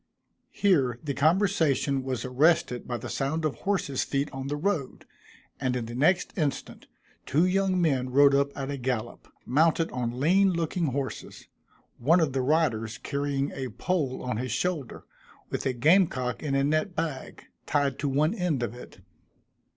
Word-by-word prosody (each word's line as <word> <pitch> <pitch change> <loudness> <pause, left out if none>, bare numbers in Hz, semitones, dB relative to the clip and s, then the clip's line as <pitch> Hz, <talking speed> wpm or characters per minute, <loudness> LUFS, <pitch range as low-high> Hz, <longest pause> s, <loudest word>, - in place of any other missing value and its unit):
Here 140 - +2
the 145 -2 -2
conversation 155 -4 +2
was 130 -2 -3
arrested 130 -1 +2
by 120 - -2
the - - -7
sound 155 +4 -2
of 150 - 0
horses' 190 -9 -1
feet 140 +1 -2
on 135 0 -5
the 145 - -2
road, 155 -4 -2 0.5
and 130 -1 -1
in 120 -2 -2
the 115 - -7
next 160 +9 +1
instant, 150 -6 -3 0.4
two 155 +6 +3
young 190 0 +1
men 135 -7 +1
rode 140 +2 +5
up 140 0 +2
at 135 0 -3
a 140 - -3
gallop, 125 -3 -4 0.2
mounted 160 +4 +2
on 125 -1 -3
lean 185 +6 +4
looking 170 0 -1
horses; 135 0 -5 0.5
one 160 +9 +4
of 155 -5 +1
the 135 - 0
riders 125 -6 0
carrying 140 -1 -2
a 130 -2 -5
pole 135 - -2
on 125 -4 -2
his 125 +1 -3
shoulder, 155 0 -2 0.5
with - - -2
a 130 - 0
game 160 +10 +5
cock 125 -3 -4
in 145 -3 -1
a 135 - +2
net 155 +5 0
bag, 155 -5 -4 0.2
tied 140 -2 0
to 145 - -1
one 150 +6 +2
end 175 - -1
of 115 -1 -3
it. 120 -6 -12
140 Hz, 170 wpm, -27 LUFS, 130-165 Hz, 0.5 s, rode